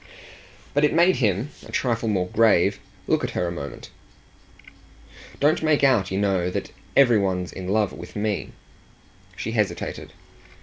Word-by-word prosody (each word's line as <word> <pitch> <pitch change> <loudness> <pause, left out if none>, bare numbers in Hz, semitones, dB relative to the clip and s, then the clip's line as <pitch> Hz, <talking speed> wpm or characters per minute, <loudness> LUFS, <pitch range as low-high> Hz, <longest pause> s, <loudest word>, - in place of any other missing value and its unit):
But 145 - +2
it 150 - +3
made 175 +3 +4
him 110 +4 0 0.2
a - - -11
trifle 115 -3 0
more 95 -3 0
grave 110 -3 +3 0.3
look - - +1
at - - -1
her 90 - +1
a - - -3
moment. 70 -4 -8 1.5
"Don't 150 +2 +3
make 155 -2 +2
out, 120 -9 +3
you 95 - -2
know, 95 -3 +1
that - - -4 0.3
every 120 -5 +6
one's 90 -2 -1
in 95 -1 -7
love 105 0 +1
with - - -10
me." 105 -1 -2 0.8
She 110 - -4
hesitated. 105 -3 -2
105 Hz, 155 wpm, -24 LUFS, 95-130 Hz, 1.5 s, every